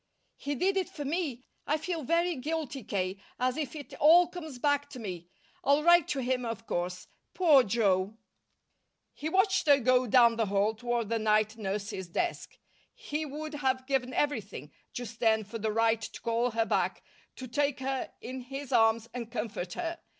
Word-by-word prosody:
"He 285 Hz, +1 st, -4 dB
did 385 Hz, +7 st, +1 dB
it 375 Hz, -, 0 dB
for 290 Hz, -, -7 dB
me. 285 Hz, -5 st, -2 dB, 0.2 s
I 305 Hz, -, +2 dB
feel 330 Hz, +1 st, -3 dB
very 335 Hz, +5 st, +1 dB
guilty, 295 Hz, -1 st, -4 dB
K., 190 Hz, -1 st, -2 dB, 0.2 s
as 255 Hz, 0 st, +1 dB
if 305 Hz, -2 st, -4 dB
it 290 Hz, -2 st, -9 dB
all 335 Hz, +4 st, +7 dB
comes 315 Hz, -6 st, -8 dB
back 285 Hz, +2 st, +1 dB
to 255 Hz, -, -9 dB
me. 180 Hz, -6 st, -6 dB, 0.4 s
I'll 285 Hz, +2 st, +3 dB
write 345 Hz, 0 st, +6 dB
to 275 Hz, -, -1 dB
him, 250 Hz, 0 st, 0 dB
of 230 Hz, -1 st, -5 dB
course. 180 Hz, 0 st, -3 dB, 0.3 s
Poor 315 Hz, -7 st, +6 dB
Joe!" 200 Hz, -2 st, +1 dB, 1.0 s
He 310 Hz, -, -4 dB
watched 380 Hz, 0 st, +2 dB
her 285 Hz, -1 st, +7 dB
go 255 Hz, -1 st, +3 dB
down 235 Hz, 0 st, +5 dB
the 225 Hz, -2 st, +1 dB
hall 200 Hz, +2 st, +2 dB
toward 235 Hz, -1 st, -2 dB
the 230 Hz, -1 st, 0 dB
night 215 Hz, 0 st, +2 dB
nurse's 200 Hz, -3 st, -4 dB
desk. 350 Hz, -, -3 dB, 0.4 s
He 315 Hz, -11 st, -4 dB
would 305 Hz, +2 st, -6 dB
have 260 Hz, -3 st, 0 dB
given 260 Hz, -2 st, 0 dB
everything 205 Hz, -, -2 dB, 0.2 s
just 235 Hz, -1 st, -7 dB
then 220 Hz, -2 st, +3 dB
for 220 Hz, +3 st, -7 dB
the 220 Hz, 0 st, -1 dB
right 225 Hz, 0 st, +2 dB
to -, -, -8 dB
call 235 Hz, +1 st, +1 dB
her 225 Hz, -1 st, 0 dB
back, -, -, 0 dB, 0.3 s
to 260 Hz, -, -7 dB
take 280 Hz, +2 st, 0 dB
her 265 Hz, 0 st, -2 dB
in 255 Hz, +2 st, -6 dB
his 270 Hz, +2 st, -7 dB
arms 225 Hz, -1 st, +3 dB
and 235 Hz, -2 st, -6 dB
comfort 215 Hz, -6 st, -4 dB
her. 335 Hz, -1 st, -4 dB
250 Hz, 180 wpm, -30 LUFS, 220-295 Hz, 1.0 s, all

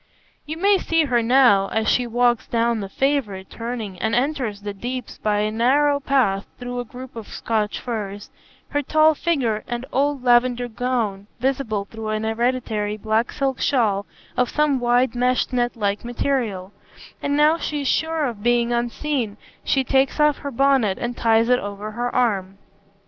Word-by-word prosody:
You 315 Hz, +1 st, -4 dB
may 395 Hz, +2 st, +3 dB
see 330 Hz, -2 st, +2 dB
her 245 Hz, -4 st, +2 dB
now, 230 Hz, -5 st, +5 dB
as 220 Hz, +1 st, -1 dB
she 250 Hz, -1 st, +2 dB
walks 240 Hz, 0 st, +1 dB
down 235 Hz, -1 st, +1 dB
the 195 Hz, -2 st, -5 dB
favourite 225 Hz, -7 st, -1 dB
turning 230 Hz, -6 st, -5 dB
and 220 Hz, -, +1 dB
enters 245 Hz, -6 st, -1 dB
the 205 Hz, -1 st, -4 dB
Deeps 245 Hz, +4 st, -6 dB
by 210 Hz, -1 st, +1 dB
a 215 Hz, 0 st, 0 dB
narrow 280 Hz, +6 st, +3 dB
path 250 Hz, -9 st, +1 dB
through 245 Hz, 0 st, -5 dB
a 245 Hz, -, -4 dB
group 255 Hz, +2 st, -10 dB
of 225 Hz, -2 st, -7 dB
Scotch 215 Hz, -2 st, -2 dB
firs, 205 Hz, -4 st, -5 dB, 0.4 s
her 290 Hz, -, 0 dB
tall 310 Hz, +2 st, +4 dB
figure 265 Hz, -10 st, 0 dB
and 240 Hz, +1 st, -4 dB
old 280 Hz, 0 st, +1 dB
lavender 245 Hz, 0 st, +3 dB
gown 225 Hz, -4 st, -2 dB
visible 245 Hz, -6 st, -1 dB
through 220 Hz, +1 st, -8 dB
an 215 Hz, 0 st, -1 dB
hereditary 220 Hz, -2 st, -1 dB
black 220 Hz, +2 st, 0 dB
silk 270 Hz, -3 st, -1 dB
shawl 210 Hz, -7 st, +1 dB, 0.3 s
of 250 Hz, -1 st, +1 dB
some 295 Hz, -3 st, +1 dB
wide 245 Hz, 0 st, +2 dB
meshed 250 Hz, +1 st, +1 dB
net 240 Hz, -1 st, 0 dB
like 205 Hz, -2 st, -1 dB
material; 235 Hz, -6 st, -2 dB, 0.5 s
and 285 Hz, 0 st, 0 dB
now 305 Hz, +2 st, +4 dB
she 295 Hz, -1 st, -2 dB
is 275 Hz, -, -2 dB
sure 320 Hz, +1 st, +1 dB
of 230 Hz, -6 st, -4 dB
being 240 Hz, +1 st, +2 dB
unseen 240 Hz, -1 st, -2 dB, 0.3 s
she 270 Hz, -, +1 dB
takes 270 Hz, +3 st, +1 dB
off 300 Hz, -1 st, +3 dB
her 285 Hz, -, -5 dB
bonnet 265 Hz, -6 st, +2 dB
and 240 Hz, 0 st, -3 dB
ties 225 Hz, -1 st, +3 dB
it 250 Hz, 0 st, +4 dB
over 205 Hz, +1 st, -6 dB
her 240 Hz, +3 st, -2 dB
arm. 195 Hz, -6 st, 0 dB
240 Hz, 170 wpm, -22 LUFS, 215-270 Hz, 0.5 s, now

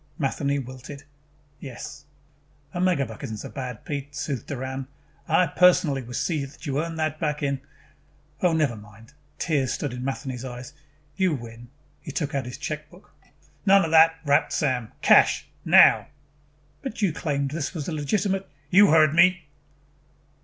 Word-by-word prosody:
Matheny 140 Hz, -2 st, -1 dB
wilted. 130 Hz, +2 st, -8 dB, 0.6 s
"Yes." 140 Hz, +2 st, -9 dB, 0.7 s
"A 175 Hz, -, -4 dB
megabuck 140 Hz, -, 0 dB
isn't 110 Hz, -6 st, -5 dB
so -, -, -7 dB
bad, 125 Hz, -4 st, -7 dB
Pete," 145 Hz, -1 st, -5 dB
soothed 135 Hz, -3 st, -4 dB
Doran. 130 Hz, -1 st, -5 dB, 0.4 s
"I 180 Hz, -, +4 dB
personally 175 Hz, -4 st, +3 dB
will 120 Hz, 0 st, -8 dB
see 155 Hz, -5 st, -1 dB
that 140 Hz, +4 st, -11 dB
you 140 Hz, 0 st, 0 dB
earn 165 Hz, -1 st, -6 dB
it 155 Hz, -1 st, -1 dB
back 150 Hz, -2 st, -2 dB
in 140 Hz, -1 st, -1 dB, 0.4 s
" 150 Hz, +1 st, -35 dB
"Oh, 180 Hz, -, +3 dB
never 155 Hz, -7 st, +1 dB
mind." 110 Hz, +4 st, -15 dB, 0.2 s
Tears 145 Hz, -6 st, 0 dB
stood 140 Hz, -4 st, -3 dB
in 125 Hz, 0 st, -6 dB
Matheny's 135 Hz, -2 st, -4 dB
eyes. 125 Hz, +2 st, -8 dB, 0.4 s
"You 185 Hz, -5 st, +2 dB
win." 115 Hz, -1 st, -10 dB, 0.3 s
He 155 Hz, -, -7 dB
took 145 Hz, 0 st, -3 dB
out 135 Hz, -3 st, -1 dB
his 125 Hz, -, -7 dB
checkbook. 155 Hz, +5 st, -7 dB, 0.6 s
"None 195 Hz, -1 st, +6 dB
of 160 Hz, -, -4 dB
that," 165 Hz, 0 st, +6 dB
rapped 145 Hz, 0 st, +2 dB
Sam. 130 Hz, -6 st, -1 dB
"Cash. -, -, +5 dB, 0.2 s
Now." -, -, +6 dB, 0.7 s
"But 265 Hz, -5 st, -5 dB
you 185 Hz, -6 st, +2 dB
claimed 140 Hz, -3 st, -2 dB
this 155 Hz, +3 st, -4 dB
was 150 Hz, -3 st, -4 dB
a -, -, -3 dB
legitimate 190 Hz, +5 st, -1 dB
" 145 Hz, -, -36 dB
"You 200 Hz, +3 st, +7 dB
heard 155 Hz, -1 st, +5 dB
me." 175 Hz, 0 st, +4 dB
145 Hz, 160 wpm, -25 LUFS, 130-165 Hz, 0.7 s, You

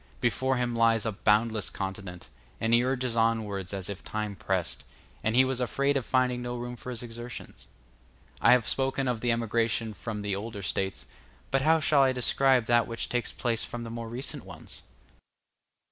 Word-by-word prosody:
Before 130 Hz, +3 st, +1 dB
him 120 Hz, -1 st, -1 dB
lies 115 Hz, -1 st, +3 dB
a 110 Hz, -, +1 dB
boundless 110 Hz, +1 st, +2 dB
continent, 95 Hz, -2 st, -6 dB, 0.3 s
and 115 Hz, +1 st, +1 dB
he 120 Hz, +1 st, +6 dB
urges 130 Hz, -2 st, 0 dB
onwards 110 Hz, -5 st, 0 dB
as 95 Hz, -2 st, -4 dB
if 100 Hz, -1 st, -6 dB
time 105 Hz, -1 st, -3 dB
pressed, 95 Hz, -3 st, -1 dB, 0.4 s
and 110 Hz, +1 st, +1 dB
he 130 Hz, +1 st, +7 dB
was 130 Hz, -1 st, -1 dB
afraid 140 Hz, +3 st, +1 dB
of 135 Hz, -4 st, -1 dB
finding 125 Hz, -1 st, +2 dB
no 120 Hz, 0 st, -4 dB
room 120 Hz, 0 st, -5 dB
for 125 Hz, -, -9 dB
his 125 Hz, -1 st, -5 dB
exertions. 120 Hz, +1 st, -8 dB, 0.7 s
I -, -, +6 dB
have 125 Hz, -3 st, +3 dB
spoken 135 Hz, 0 st, 0 dB
of 120 Hz, -3 st, -1 dB
the 120 Hz, -, +2 dB
emigration 115 Hz, -1 st, 0 dB
from 105 Hz, -1 st, -5 dB
the 100 Hz, -1 st, -1 dB
older 105 Hz, 0 st, -5 dB
States, 95 Hz, -1 st, -2 dB, 0.5 s
but 135 Hz, -, +3 dB
how 160 Hz, +3 st, +4 dB
shall 150 Hz, -2 st, +4 dB
I 130 Hz, -1 st, +4 dB
describe 130 Hz, 0 st, +3 dB
that 120 Hz, -1 st, +3 dB
which 115 Hz, -1 st, -3 dB
takes 120 Hz, -2 st, -1 dB
place 115 Hz, -2 st, 0 dB
from 120 Hz, -1 st, -5 dB
the 115 Hz, -, -6 dB
more 115 Hz, -1 st, -5 dB
recent 125 Hz, +4 st, -4 dB
ones? -, -, -9 dB
115 Hz, 185 wpm, -28 LUFS, 110-125 Hz, 0.7 s, he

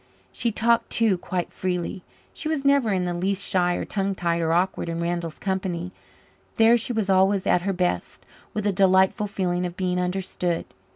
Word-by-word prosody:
She 235 Hz, -2 st, -1 dB
talked 230 Hz, +2 st, +2 dB
too 225 Hz, -4 st, +2 dB
quite 180 Hz, 0 st, -4 dB
freely; 180 Hz, +1 st, -3 dB, 0.3 s
she 310 Hz, -, -5 dB
was 295 Hz, -3 st, -2 dB
never 280 Hz, -5 st, +4 dB
in 185 Hz, -2 st, +1 dB
the 175 Hz, -1 st, -1 dB
least 195 Hz, +3 st, -1 dB
shy 180 Hz, -1 st, +1 dB
or -, -, -3 dB
tongue 195 Hz, -1 st, -2 dB
tied 170 Hz, -1 st, 0 dB
or 165 Hz, 0 st, +1 dB
awkward 175 Hz, 0 st, 0 dB
in 165 Hz, 0 st, -3 dB
Randall's 170 Hz, -1 st, -2 dB
company. 185 Hz, -2 st, -3 dB, 0.6 s
There 225 Hz, +1 st, +6 dB
she 240 Hz, +1 st, -1 dB
was 220 Hz, -4 st, -1 dB
always 190 Hz, 0 st, +3 dB
at 180 Hz, -, +3 dB
her 195 Hz, +2 st, -1 dB
best, 180 Hz, -, -2 dB, 0.3 s
with 210 Hz, -1 st, -3 dB
a 205 Hz, -, +2 dB
delightful 190 Hz, +2 st, +3 dB
feeling 180 Hz, -3 st, -1 dB
of 175 Hz, 0 st, -4 dB
being 180 Hz, -1 st, 0 dB
understood. 180 Hz, -1 st, -2 dB
185 Hz, 185 wpm, -24 LUFS, 175-200 Hz, 0.6 s, There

